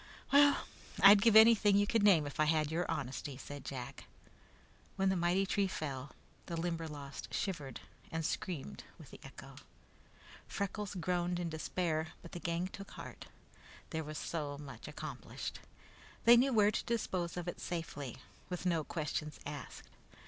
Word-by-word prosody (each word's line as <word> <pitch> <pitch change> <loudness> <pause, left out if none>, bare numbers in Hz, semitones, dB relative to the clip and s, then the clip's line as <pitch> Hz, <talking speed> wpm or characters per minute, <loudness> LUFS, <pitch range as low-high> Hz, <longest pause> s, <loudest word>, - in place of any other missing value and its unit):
"Well, 285 0 +6 0.4
I'd 200 +1 +10
give 225 0 +5
anything 220 -2 +8
you 205 - +4
could 225 +1 +2
name 190 -7 +6
if 145 - -7
I 155 - +5
had 155 -1 +2
your 170 +2 -1
honesty," 135 -1 -3
said 145 0 -8
Jack. 125 -2 -6 0.9
When 195 0 +2
the 190 - +2
mighty 175 +2 +2
tree 200 0 +1
fell, 140 -6 -5 0.3
the 170 - -3
Limberlost 160 -5 -4
shivered 145 - -3 0.3
and 160 0 -2
screamed 165 - -4
with - - -13
the - - -11
echo. - - -11 0.9
Freckles 200 0 -3
groaned 175 0 0
in 175 -1 -2
despair, 160 0 -2
but 170 - -10
the 175 - -6
gang 170 +2 -1
took 195 +1 -9
heart. - - -9 0.6
That 160 -1 -2
was 155 0 -6
so 145 -4 -3
much 140 -2 -9
accomplished. - - -6 0.7
They 235 +1 +10
knew 260 +3 +4
where 210 -3 +5
to - - -2
dispose 185 -7 -2
of 175 0 -4
it 175 - -4
safely, 150 -7 -4 0.3
with 180 0 -4
no 170 -3 +2
questions 150 -1 -3
asked. 145 -4 -7
170 Hz, 155 wpm, -34 LUFS, 150-195 Hz, 0.9 s, I'd